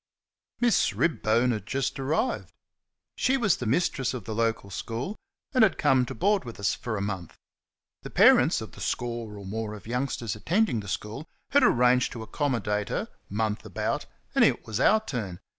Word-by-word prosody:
Miss 240 -1 +3
Ribbone 125 -6 +2
had 105 -3 -4
just 135 0 -2
arrived. 155 - -1 0.6
She 265 +1 +2
was 205 - +2
the 125 - -4
mistress 130 -1 +1
of 115 -7 -7
the 110 - -4
local 115 -3 -1
school, 120 - -4 0.4
and 255 -3 +5
had 195 -6 +3
come 130 -4 +3
to - - -6
board 200 0 +2
with 115 -4 -9
us 95 -5 +1
a 110 -4 -1
month. 95 -4 -4 0.6
The - - -8
parents - - +5
of - - -7
the - - -12
score 115 -3 -3
of 100 - -9
more 105 +2 -4
of 105 - -12
youngsters 120 -2 -2
attending 170 - +1
the 100 - -8
school 110 +10 -5 0.2
had 285 - +5
arranged 125 +1 +4
to 115 - -6
accommodate 110 -5 -1
her, - - -2 0.2
month 105 +1 -1
about, - - -3 0.3
and - - +4
it - - +2
was 110 0 -3
our 220 +9 +4
turn. 105 - -4
120 Hz, 175 wpm, -27 LUFS, 105-145 Hz, 0.6 s, and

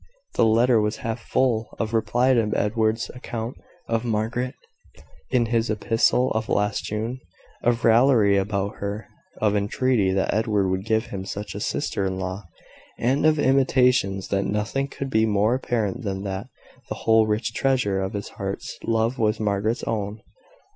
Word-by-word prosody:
The - - +3
letter 115 +1 +4
was 105 +1 -1
half 115 +1 -2
full 115 -2 0
of 115 0 -2
reply 120 +4 +2
to 115 -4 +2
Edward's 110 +1 0
account 120 -1 -6 0.3
of 115 0 0
Margaret, 120 +3 -1 0.7
in 125 -2 +2
his 115 0 0
epistle 115 +3 +2
of 110 0 -2
last 105 0 0
June 110 +4 -3 0.4
of 120 -1 +1
raillery 115 -3 +5
about 100 +1 -1
her, 100 +2 -4 0.3
of 105 -1 +2
intreaty 105 0 +1
that 95 0 +1
Edward 105 -3 +1
would 95 +1 -2
give 110 -1 +1
him 95 -1 -4
such 100 +2 -6
a - - -5
sister 100 - -2
in 95 0 -3
law, 95 +1 -4 0.5
and 135 +6 +2
of 155 0 +3
intimations 125 -8 +2
that 100 0 0
nothing 110 +7 -1
could 140 -1 -6
be 110 0 +3
more 105 +2 +2
apparent 115 -6 -1
than 95 -2 -3
that 100 +4 -4 0.4
the - - -3
whole 110 -1 +5
rich 110 +1 -1
treasure 125 -8 +1
of 95 0 -3
his 100 -1 -4
heart's - - -6
love 115 +2 0
was 110 -1 +1
Margaret's 105 +3 0
own. 105 -1 -3
110 Hz, 160 wpm, -24 LUFS, 100-120 Hz, 0.7 s, raillery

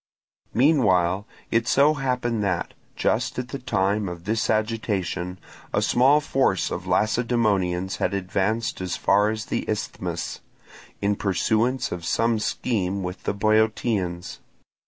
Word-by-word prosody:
Meanwhile 105 - +3 0.2
it 115 0 +2
so 145 +4 +5
happened 125 -5 -1
that, 90 -4 -1 0.2
just 120 +3 0
at 125 0 -3
the 140 - -5
time 100 -4 0
of 85 -1 -8
this 110 +3 -1
agitation, 100 -5 -1 0.3
a - - +2
small 135 +4 +4
force 135 - +1
of - - -4
Lacedaemonians 105 -6 +1
had 100 - 0
advanced 100 +4 -1
as 90 -2 -2
far 105 +1 +3
as 110 0 -3
the - - -2
Isthmus, - - -3 0.6
in 100 0 +2
pursuance 110 +6 0
of 90 -1 -5
some 115 +6 +1
scheme 100 -4 -1
with 90 +1 -6
the - - 0
Boeotians. 110 -4 0
110 Hz, 130 wpm, -24 LUFS, 95-120 Hz, 0.6 s, so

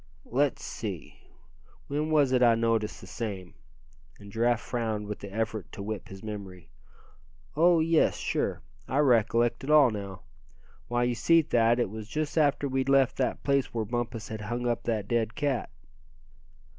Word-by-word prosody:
"Let's 140 +2 0
see, - - -6 0.7
when 150 +2 -2
was 145 -4 +3
it 125 -1 +3
I 120 -2 +6
noticed 115 -2 0
the - - -10
same?" 100 -6 -6 0.6
and 100 0 -13
Giraffe 115 +2 +2
frowned 110 -4 -3
with 105 0 -5
the 100 - -9
effort 110 -1 -3
to 100 - -6
whip 110 +1 -5
his 95 +1 -11
memory. 95 -7 -8 0.8
"Oh! 170 +1 +5
yes, 165 0 +3
sure, - - -2 0.2
I 130 - -1
recollect 120 -3 +3
it 135 - -5
all 150 -5 +6
now. 100 -3 -6 0.7
Why, 120 0 0
you 120 0 +1
see 165 +7 +4
Thad, 120 -3 +2
it 120 -5 0
was 110 -1 -7
just 155 +5 -3
after 145 -2 +2
we'd 130 0 -1
left 135 -2 +3
that 130 - -1
place 140 -3 0
where 110 -2 -1
Bumpus 115 -1 -4
had 110 -1 -5
hung 120 +3 -3
up 120 -1 -1
that 110 -4 -1
dead 115 -1 0
cat." 145 -5 -1
120 Hz, 170 wpm, -28 LUFS, 110-135 Hz, 0.8 s, I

